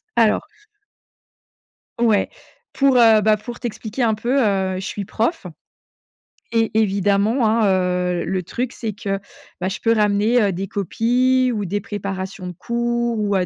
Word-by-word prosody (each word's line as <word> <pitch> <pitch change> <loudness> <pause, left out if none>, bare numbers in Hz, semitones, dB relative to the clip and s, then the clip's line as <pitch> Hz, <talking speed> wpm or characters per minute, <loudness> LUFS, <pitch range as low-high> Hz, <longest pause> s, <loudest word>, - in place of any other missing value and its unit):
Alors. 230 +5 +2 1.5
Ouais. 225 -4 +2 0.4
Pour, 275 -2 +3
heu, 225 -3 +6
bah, 215 0 +3
pour 235 +3 -9
t'expliquer 235 +1 -4
un 225 - +3
peu, 240 +6 0
heu, 195 -5 +1
je 190 - -6
suis 200 0 -4
prof 230 - -2 1.1
et, 225 -1 +2
évidemment 205 +4 +2
hein, 220 -1 +3
heu, 180 -1 0
le 185 +1 -2
truc 245 +8 -3
c'est 220 -3 -5
que, 195 -1 -3 0.4
bah, 185 - 0
je 195 - -5
peux 230 - +1
ramener, 210 +2 +2
heu, 200 -2 +2
des 190 +2 -4
copies, 250 +6 +1
ou 205 -2 -2
des 205 +3 -2
préparations 195 -2 -5
de 180 - -6
cours 235 +3 -1
ou, 205 -1 0
heu, 185 -1 +1
215 Hz, 155 wpm, -20 LUFS, 195-235 Hz, 1.5 s, heu